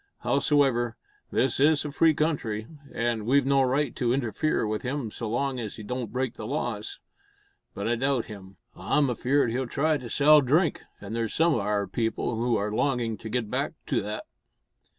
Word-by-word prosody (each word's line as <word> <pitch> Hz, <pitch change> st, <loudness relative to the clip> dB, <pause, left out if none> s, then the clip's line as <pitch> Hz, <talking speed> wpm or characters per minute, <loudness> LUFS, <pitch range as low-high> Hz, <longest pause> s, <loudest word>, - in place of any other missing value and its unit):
Howsoever, 135 Hz, -5 st, +2 dB, 0.3 s
this 130 Hz, -1 st, +1 dB
is 150 Hz, +1 st, +4 dB
a 150 Hz, -, -3 dB
free 160 Hz, +2 st, +4 dB
country, 135 Hz, -9 st, -1 dB, 0.3 s
an' 115 Hz, -2 st, -1 dB
we've 140 Hz, +1 st, +4 dB
no 135 Hz, 0 st, +4 dB
right 135 Hz, +1 st, +1 dB
to 120 Hz, -1 st, +1 dB
interfere 130 Hz, +1 st, 0 dB
with 105 Hz, 0 st, -2 dB
him 125 Hz, -3 st, -3 dB
so 115 Hz, 0 st, -5 dB
long 130 Hz, +3 st, -1 dB
as 110 Hz, -4 st, -5 dB
he 110 Hz, -, -9 dB
don't 120 Hz, 0 st, -4 dB
break 130 Hz, 0 st, -1 dB
the 110 Hz, -, -7 dB
laws. 120 Hz, -5 st, -3 dB, 0.8 s
But 100 Hz, -, -3 dB
I 120 Hz, -, +2 dB
doubt 135 Hz, -1 st, +1 dB
him. 100 Hz, -2 st, -11 dB, 0.2 s
I'm 140 Hz, -4 st, +1 dB
afeard 130 Hz, +1 st, +1 dB
he'll 130 Hz, +2 st, -1 dB
try 150 Hz, +5 st, +1 dB
to 125 Hz, -2 st, -8 dB
sell 150 Hz, +3 st, +6 dB
drink, 150 Hz, +6 st, +2 dB, 0.2 s
an' 105 Hz, +1 st, -7 dB
there's 115 Hz, -1 st, -2 dB
some 165 Hz, 0 st, +4 dB
o' 115 Hz, -, +1 dB
our 105 Hz, 0 st, 0 dB
people 115 Hz, +4 st, -2 dB
who 120 Hz, +1 st, +1 dB
are 105 Hz, 0 st, -1 dB
longin' 120 Hz, -1 st, 0 dB
to 110 Hz, -, -8 dB
git 115 Hz, -2 st, -2 dB
back -, -, -1 dB
to -, -, 0 dB
that." 105 Hz, +1 st, -4 dB
125 Hz, 190 wpm, -27 LUFS, 110-140 Hz, 0.8 s, sell